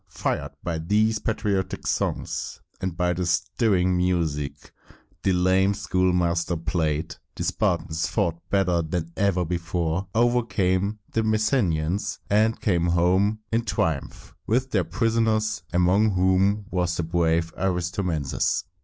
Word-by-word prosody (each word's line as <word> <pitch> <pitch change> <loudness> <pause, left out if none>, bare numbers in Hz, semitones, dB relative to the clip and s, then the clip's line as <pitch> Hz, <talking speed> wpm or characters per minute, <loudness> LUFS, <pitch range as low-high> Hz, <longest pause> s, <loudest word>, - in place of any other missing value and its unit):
Fired - - -3
by 85 -2 -2
these 105 +6 +2
patriotic 105 -3 -2
songs, - - -2 0.2
and 95 -3 -3
by 90 0 +1
the 90 +1 -2
stirring 90 +1 +1
music 80 -6 -1 0.5
the 95 - +2
lame 95 +2 +3
schoolmaster 90 -3 +1
played, 80 -1 -2 0.2
the - - -4
Spartans 80 +1 0
fought 85 -1 -1
better 90 -4 +2
than 80 +1 -3
ever 95 -2 +1
before, 85 +1 -2
overcame 110 -4 +1
the 115 - +1
Messenians, 105 - 0
and 110 +2 +3
came 85 -4 +1
home 95 +5 +2
in 115 +1 +1
triumph 80 -8 -2
with 130 +4 +1
their 95 -5 +1
prisoners, 110 +1 +1
among 95 +4 +3
whom 95 +3 +2
was 90 -1 0
the 85 - -1
brave 85 0 +1
Aristomenes. 90 -4 -1
90 Hz, 120 wpm, -25 LUFS, 85-105 Hz, 0.5 s, lame